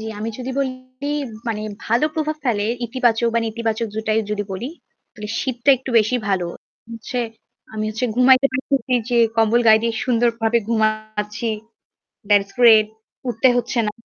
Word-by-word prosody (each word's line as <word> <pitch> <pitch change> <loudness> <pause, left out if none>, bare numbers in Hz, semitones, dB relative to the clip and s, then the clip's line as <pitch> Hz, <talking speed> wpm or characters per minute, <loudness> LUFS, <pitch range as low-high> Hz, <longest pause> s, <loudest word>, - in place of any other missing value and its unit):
জি, 220 - -6
আমি 220 +2 -3
যদি 255 +1 -4
বলি, 270 -1 +1 0.8
মানে 215 -1 -2 0.2
ভালো 235 +6 +2
প্রভাব 310 -1 -1
ফেলে 210 -5 +1 0.2
ইতিবাচক 235 -1 +1
বা - - +4
নেতিবাচক 225 0 -2
দুটাই 220 0 0
যদি 205 -1 -1
বলি 225 +8 -4 0.4
তাহলে 210 -1 -8
শীতটা 255 +1 +1
একটু 260 +1 -7
বেশি 220 +3 +1
ভালো। 185 -3 0 0.5
হচ্ছে 230 +2 -5 0.5
আমি 215 0 -3
হচ্ছে 220 +4 -3
ঘুমাইতে 255 +2 +6
পারতেছি 265 0 -1 0.2
যে 240 - +2 0.2
কম্বল 225 +1 +3
গায়ে 220 0 +7
দিয়ে 230 -1 0
সুন্দরভাবে 235 -1 +2
ঘুমাচ্ছি। 215 0 -1 0.8
That's 200 -1 +3
great। 225 -3 +7 0.4
উঠতে 245 +2 +2
হচ্ছে 240 0 -1
না। - - -1
230 Hz, 150 wpm, -21 LUFS, 215-250 Hz, 0.8 s, গায়ে